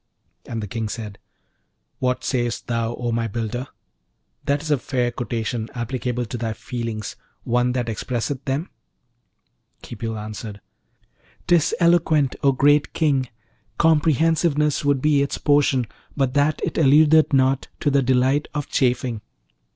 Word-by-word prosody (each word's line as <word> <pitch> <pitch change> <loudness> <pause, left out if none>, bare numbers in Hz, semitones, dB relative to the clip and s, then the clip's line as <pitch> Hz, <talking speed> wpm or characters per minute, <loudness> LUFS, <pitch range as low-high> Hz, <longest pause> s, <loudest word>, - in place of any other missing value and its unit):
And 115 -2 -4
the - - -5
King 110 +2 -3
said, 105 -3 -6 0.8
'What 125 0 0
sayest 120 -3 -1
thou, 115 0 -1
O 120 -1 -3
my 115 0 0
builder? 115 +4 -4 0.8
that 140 +2 0
is 155 - -3
a 145 - +3
fair 125 -2 -1
quotation, 115 -1 -3
applicable 125 0 -2
to 120 +1 -6
thy 115 -1 -2
feelings, 115 -2 -5 0.3
one 125 +1 +1
that 125 -2 -1
expresseth 125 +4 -3
them?' 140 +6 -2 1.1
Khipil 115 -1 -5
answered, 105 0 -7 0.9
''Tis 175 -3 +3
eloquent, 160 -5 +3
O 140 - +4
great 145 +2 +3
King! 140 -6 +1 0.5
comprehensiveness 155 -1 +2
would 140 -2 +1
be 150 -2 +4
its 140 - -1
portion, 145 -3 +2 0.3
but 135 -2 +1
that 145 +2 +2
it - - -1
alludeth 155 +2 +5
not 135 -1 +2
to 145 - +2
the 140 0 +3
delight 130 +3 +2
of 145 -2 -2
chafing.' 125 -3 0
130 Hz, 135 wpm, -22 LUFS, 115-145 Hz, 1.1 s, alludeth